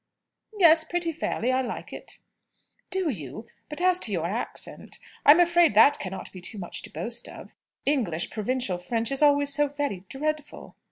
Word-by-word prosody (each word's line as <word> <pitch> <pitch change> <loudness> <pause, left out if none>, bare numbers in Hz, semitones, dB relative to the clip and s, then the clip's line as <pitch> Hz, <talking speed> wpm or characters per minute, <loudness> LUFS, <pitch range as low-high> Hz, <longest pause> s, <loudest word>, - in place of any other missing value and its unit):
"Yes; 325 -4 +6
pretty 340 +1 -1
fairly. 255 -5 -2
I 260 0 +1
like 250 - -6
it." - - -10 0.7
"Do 370 -4 -1
you? 160 - -7 0.2
But, 300 +2 -5
as 365 0 +3
to 225 - 0
your 170 -4 -1
accent 215 +8 -4 0.3
I'm 295 +4 +9
afraid 345 -7 +4
that 230 +7 +6
cannot 190 0 -6
be 185 - -10 0.2
much 175 -3 -5
to - - -8
boast - - -4
of. - - -11 0.3
English 215 - 0
provincial 215 -4 -2
French 225 +6 -1
is 275 - 0
always 285 -1 +4
so 295 +1 +3
very 285 -10 -4
dreadful." 305 +2 -4
275 Hz, 165 wpm, -26 LUFS, 210-310 Hz, 0.7 s, I'm